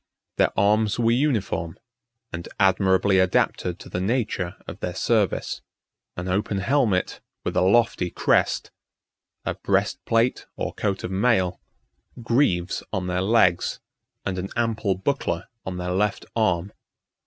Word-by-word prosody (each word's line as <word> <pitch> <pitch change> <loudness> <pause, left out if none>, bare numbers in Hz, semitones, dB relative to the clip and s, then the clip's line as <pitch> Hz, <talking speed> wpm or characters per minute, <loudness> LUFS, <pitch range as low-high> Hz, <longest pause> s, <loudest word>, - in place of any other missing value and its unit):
Their - - +4
arms 105 +1 +3
were 115 -1 +3
uniform, 110 - 0 0.6
and 85 0 -5
admirably 95 0 +4
adapted 90 -1 +1
to - - -12
the 90 - -3
nature 105 -4 -1
of - - -8
their 90 - -4
service: 105 -2 0 0.6
an 90 +1 -4
open 100 +2 0
helmet, 105 -3 +1 0.2
with - - -3
a - - +3
lofty 95 -1 +3
crest; - - +1 0.7
a - - 0
breastplate, 115 +2 0
or - - -3
coat 100 -2 -2
of - - -4
mail; 95 -3 +1 0.6
greaves 115 -7 +1
on 95 -3 -2
their 90 0 -1
legs, 95 -4 +3 0.5
and 95 -1 -2
an 95 +2 -4
ample 115 -4 0
buckler 95 -4 -2 0.2
on 90 -1 -3
their 90 0 -3
left 100 +3 0
arm. 95 -4 +1
95 Hz, 130 wpm, -24 LUFS, 90-115 Hz, 0.7 s, Their